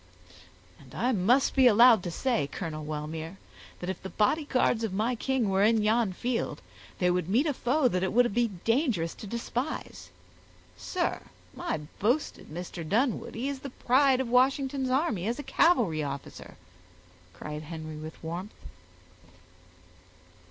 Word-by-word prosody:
"And 130 - -15
I 250 +2 +1
must 240 +6 +3
be 265 -2 +6
allowed 235 -1 +7
to 175 - -4
say, 170 - 0
Colonel 155 -4 -5
Wellmere, 155 +3 -5 0.4
that 180 - -5
if 190 - -9
the 190 - -6
bodyguards 250 0 +1
of 220 - -1
my 220 +5 0
king 255 -1 0
were 195 0 +1
in 220 0 +3
yon 220 -1 +2
field, 240 +5 -2 0.4
they 180 -1 +2
would 180 -1 -1
meet 240 +10 +3
a 300 - +1
foe 260 +3 +1
that 185 -6 0
it 190 - 0
would 240 -2 +3
be 240 +1 +2
dangerous 215 - 0
to 210 - -10
despise. 235 +6 -4 0.7
Sir, 360 -2 -2 0.3
my 345 - -3 0.2
boasted 245 +9 0
Mr. 170 +1 -6
Dunwoodie 230 - -1
is 280 -1 -3
the 275 - -7
pride 260 +1 +3
of 265 - -1
Washington's 265 +2 +2
army 255 - 0
as 235 +2 -1
a 290 - -5
cavalry 230 - +2
officer," 140 -1 -7 0.8
cried 150 0 -7
Henry 155 0 -7
with 155 +1 -8
warmth. 175 +6 -6
225 Hz, 150 wpm, -28 LUFS, 175-255 Hz, 0.8 s, allowed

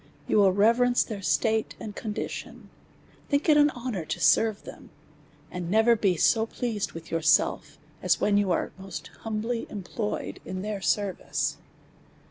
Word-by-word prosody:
You - - +2
will 200 -2 +6
reverence 235 +5 +3
their 215 -3 -6
estate 220 +3 0
and 210 -2 -7
condition, 210 -2 -6 0.6
think 285 +3 +1
it 305 - +6
an 295 0 +6
honoiu'to 235 - -4
serve 220 -2 +3
them, - - -12 0.6
and 180 -1 -5
never 220 +4 +4
be 195 -5 +1
so 225 +7 +3
pleased 225 -4 -3
with 165 0 -10
yourselves 165 -1 +2 0.2
as - - +2
when 205 - +2
you 205 -1 +2
are 170 - 0
most 195 0 -8
humbly 225 +2 -3
employed 210 +2 -4
in 185 0 -5
their 210 -2 -4
service. 195 0 -1
215 Hz, 145 wpm, -27 LUFS, 195-230 Hz, 0.6 s, will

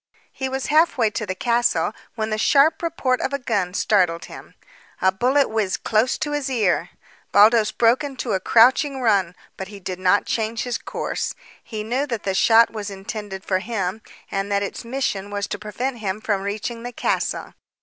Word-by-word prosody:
He 265 -1 -4
was 265 0 -3
half 315 +2 +3
way 225 -4 +2
to 215 0 -4
the 185 - -3
castle 240 +3 +1 0.2
when 220 -1 -2
the 215 - -1
sharp 280 +7 +4
report 295 -7 0
of 275 - -2
a - - +1
gun 200 -8 -1
startled 180 -5 +2
him. - - -12 0.4
A 190 - +3
bullet 255 +8 +2
whizzed 215 -4 -1
close 220 +3 +2
to 295 - -3
his 290 -2 -2
ear! 195 -8 +1 0.4
Baldos 215 +1 +5
broke 235 +5 +3
into 265 -5 -3
a 190 - +1
crouching 260 +7 +4
run, 200 -7 +2 0.2
but 190 - -5
did 190 -3 -7
not 185 +2 +3
change 225 0 -1
his 245 -1 -3
course. - - -4 0.3
He 215 -2 -5
knew 255 +6 -1
that 235 -5 -4
the 195 - -1
shot 225 +4 +5
was 210 -2 -5
intended 195 0 -7
for 185 -1 +1
him, 205 -1 -3 0.3
and 195 +1 -2
that 200 0 +1
its 200 - -5
mission 230 -5 -2
was 205 -1 -2
to - - -5
prevent 235 +4 -4
him 200 -1 -3
from 205 -3 -1
reaching 215 +4 -4
the 245 +1 -6
castle. - - -2
220 Hz, 190 wpm, -22 LUFS, 200-250 Hz, 0.4 s, Baldos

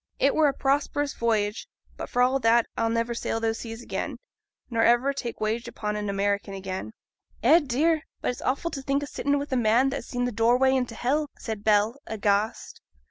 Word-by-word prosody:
It 275 - +3
were 310 -1 +4
a 280 - +1
prosperous 285 +1 0
voyage; 220 -2 0 0.3
but, - - -7
for 245 - +2
all 260 +2 +2
that, 230 -1 +4
I'll 230 0 0
never 230 +1 0
sail 230 -1 -2
those 225 0 -1
seas 225 0 -7
again, - - -4 0.5
nor 230 -2 0
ever 240 +4 +4
take 240 -4 -5
wage 220 +2 -1
aboard 210 -1 -4
an 210 -1 -3
American 200 0 -1
again.' 190 - -5 0.5
'Eh, 305 +8 +7
dear! 305 +3 +1 0.2
but - - -1
it's 245 - -9
awful 280 +6 -1
t' 275 - -5
think 275 +1 0
o' - - -2
sitting 285 0 -1
wi' 285 - -2
a - - +1
man 240 +2 +3
that 275 - -2
has - - -8
seen 245 0 -1
th' 245 - -4
doorway 245 +4 +4
into 250 -3 -1
hell,' 285 +6 0
said 220 -3 -5
Bell, 215 +3 +3
aghast. 210 0 -1
235 Hz, 205 wpm, -26 LUFS, 220-270 Hz, 0.5 s, Eh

